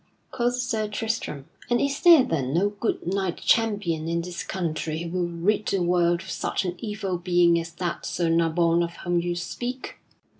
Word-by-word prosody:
quoth 245 0 0
Sir 235 -4 -1
Tristram, 210 -10 -3 0.2
"and 240 - +3
is 280 0 -1
there 335 -6 +8
then 140 - -1
no 195 +4 +3
good 205 +2 -3
knight 190 0 -1
champion 205 -9 +1
in 170 0 0
this 175 0 -5
country 160 -3 -3
who 170 - -5
will 175 - 0
rid 185 +5 0
the 195 -3 +1
world 175 0 +2
of - - -8
such - - -2
an 180 - -1
evil 200 -5 -3
being 175 -1 +3
as 165 0 -6
that 170 0 -3
Sir 170 -1 -1
Nabon 165 +1 +2
of 170 0 -4
whom 175 0 +2
you 175 0 -2
speak?" 245 +9 -5
175 Hz, 185 wpm, -25 LUFS, 170-210 Hz, 0.2 s, there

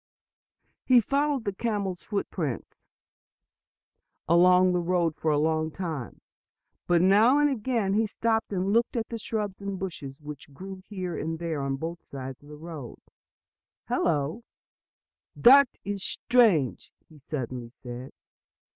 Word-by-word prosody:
He 255 -2 +6
followed 280 +1 0
the 200 - -1
camel's 200 -4 -2
footprints 170 - -4 1.5
along 180 +2 +5
the 180 - +2
road 170 -2 +1
for 160 - -1
a 150 - +3
long 155 +1 +1
time. 160 - -5 0.7
But 175 -1 +4
now 215 +8 +5
and 295 0 +3
again 225 -5 0
he 220 +1 +2
stopped 225 +1 -1
and 195 +1 0
looked 235 +2 +2
at 225 - -2
the 230 - -5
shrubs 210 -3 -3
and 200 -1 -4
bushes 145 -8 -6
which 150 -1 -10
grew 190 +3 -8
here 185 -4 -4
and 160 +1 -3
there, 165 -3 -3
on 135 0 -1
both 165 +4 -5
sides 130 -1 -8
of 145 - -16
the 150 - -10
road. 155 -6 -8 0.9
"Hello, 155 +8 0 0.9
that 275 +2 +7 0.2
is 200 -1 -3
strange!" 215 - +2 0.2
he 155 -2 -17
suddenly 130 -4 -5
said. 125 +1 -9
180 Hz, 140 wpm, -27 LUFS, 150-215 Hz, 1.5 s, that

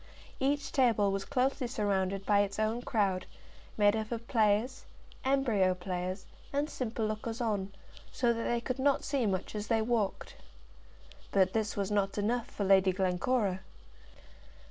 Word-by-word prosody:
Each 280 +1 0
table 230 -8 +3
was 195 0 -2
closely 260 -1 0
surrounded 195 -4 -1
by 205 -1 +4
its 200 0 0
own 220 +2 0
crowd, 195 -6 0 0.5
made 205 0 +4
up 220 0 -3
of 235 0 -4
players, 220 +3 +1 0.4
embryo 235 -9 +2
players, 180 +1 -4 0.3
and 290 +2 -1
simple 230 -3 -2
lookers 215 +2 -3
on, 205 -5 -1 0.4
so 240 -2 +2
that 230 0 -3
they 240 0 0
could 255 +2 -3
not 275 +1 +2
see 270 -5 0
much 190 -1 -2
as 210 0 -4
they 225 -2 +2
walked. 220 -4 -1 1.0
But 190 -1 +3
this 220 -2 -1
was 200 0 -1
not 200 -1 0
enough 225 +3 0
for 205 - -4
Lady 190 -1 +5
Glencora. 190 +2 0
215 Hz, 150 wpm, -31 LUFS, 195-240 Hz, 1.0 s, Lady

